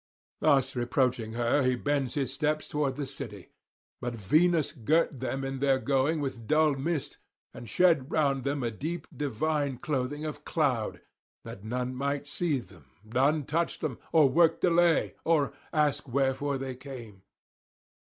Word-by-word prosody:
Thus 135 -1 +3
reproaching 120 -2 0
her 120 +4 +2
he 130 -1 +2
bends 140 0 -1
his 135 -3 -1
steps 150 +2 -1
towards 145 -3 -1
the 145 - -2
city. 135 - -9 0.5
But 120 -1 -3
Venus 155 - +2
girt 150 +2 +1
them 135 +1 -2
in 135 0 -3
their 135 -1 +3
going 140 +4 +1
with 125 -5 -4
dull 155 -1 +4
mist, 140 +2 -3 0.3
and 115 - -9
shed 165 -5 +3
round 140 -5 +1
them 140 -1 -1
a 120 - -1
deep 155 +8 -4
divine 145 0 -1
clothing 145 +2 -2
of 150 -1 -6
cloud, 135 -10 0 0.4
that 95 - -9
none 125 +3 -2
might 140 +2 -2
see 155 0 0
them, 90 - -11 0.2
none 135 +7 +1
touch 165 +5 -1
them, 145 -6 -4
or 155 -3 +6
work 165 +4 +4
delay, 175 -1 +3
or 150 -4 +2 0.2
ask 150 -2 +1
wherefore 135 +2 0
they 135 -1 -4
came. 125 -7 -10
140 Hz, 155 wpm, -29 LUFS, 125-150 Hz, 0.5 s, or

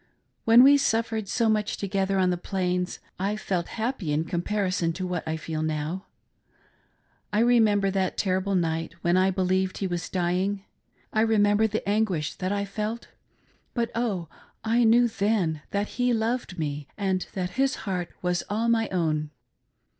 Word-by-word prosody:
When 230 +2 +8
we 285 +2 +8
suffered 225 -5 0
so 230 +3 +1
much 215 -1 +1
together 195 -1 0
on 185 -1 +3
the - - +1
Plains, 180 0 -2 0.2
I 200 +3 0
felt 185 -5 -2
happy 225 - -2
in 150 +2 +1
comparison 185 +1 -1
with 185 - -7
what 180 -3 -3
I 160 0 -1
feel 155 0 -4
now. 155 +4 -3 1.2
I 205 - 0
remember 215 -5 +4
that 190 -1 -1
terrible 190 0 0
night 165 -2 -1
when 175 +1 +3
I 185 +1 +4
believed 185 0 0
he 195 - -2
was 175 -2 -3
dying, 185 +2 -1 0.2
— - - -37
I. 220 - +3
remember 215 -1 +3
the 215 -1 -3
anguish 200 -7 0
that 185 +1 -3
I 200 0 0
felt; 215 +3 -4 0.7
but, 235 -2 0
oh, 210 -8 -1 0.4
I 230 +2 +3
knew 240 +2 +5
then 200 -8 0
that 205 +1 -1
he 245 0 0
loved 225 -4 -1
me 145 -3 -3
and 190 -3 -1
that 180 -2 -2
his 270 +5 +1
heart 180 -3 -2
was 180 -1 +1
all 225 +3 0
my 225 -1 +2
own. 155 -4 0
195 Hz, 165 wpm, -26 LUFS, 180-220 Hz, 1.2 s, When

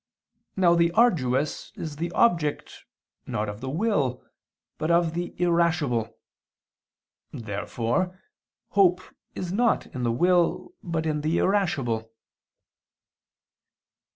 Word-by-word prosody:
Now 180 -3 +4
the 170 0 +3
arduous 155 - +1
is 155 -3 -6
the 170 +2 -3
object, 165 -10 0 0.4
not 105 +1 -2
of 105 +2 -7
the 130 - -4
will, 150 - 0 0.5
but 155 - -1
of 170 -1 +3
the 175 +1 -4
irascible. 170 -10 +1 1.1
Therefore 120 - -2 0.5
hope 185 -2 +3 0.3
is 180 -1 -4
not 235 +3 +2
in 130 - -4
the 120 -1 +1
will 175 - +1
but 165 -2 -3
in 150 -1 -1
the 155 +3 0
irascible. 135 - 0
165 Hz, 105 wpm, -26 LUFS, 130-180 Hz, 1.1 s, Now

